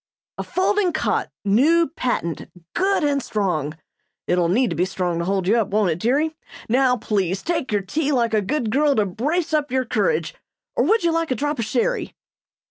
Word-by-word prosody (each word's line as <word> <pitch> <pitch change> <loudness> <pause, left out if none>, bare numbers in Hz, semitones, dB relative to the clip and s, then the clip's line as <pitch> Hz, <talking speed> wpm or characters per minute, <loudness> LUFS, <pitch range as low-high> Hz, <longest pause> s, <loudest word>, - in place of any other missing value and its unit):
"A - - -1
folding 380 -1 +1
cot 315 - 0 0.2
new 300 +12 +4
patent 245 - -3 0.2
good 385 -1 +1
and 285 -1 +1
strong. 170 - -2 0.5
(It'll 175 -1 +1
need 235 +4 +2
to - - -2
be 170 - +1
strong 180 -2 -2
to 170 - -2
hold 190 -1 -1
you 220 +4 +4
up, 220 -4 +1
won't 205 -3 +1
it, 160 - -3
dearie?) 290 - +1 0.3
Now, 250 +1 +3
please 195 -4 -1
take 330 -7 -2
your 205 -2 0
tea 290 +10 -1
like 235 -4 +1
a 215 - +3
good 230 +2 -1
girl, 285 +2 +3
to 215 - +2
brace 305 - -2
up 300 -2 +1
your 260 0 +1
courage. 475 - 0 0.4
Or 245 - +2
would 440 +6 +3
you 340 - +3
like 330 0 0
a 255 - 0
drop 290 +2 -2
of 230 - 0
sherry?" - - -1
250 Hz, 200 wpm, -22 LUFS, 195-315 Hz, 0.5 s, new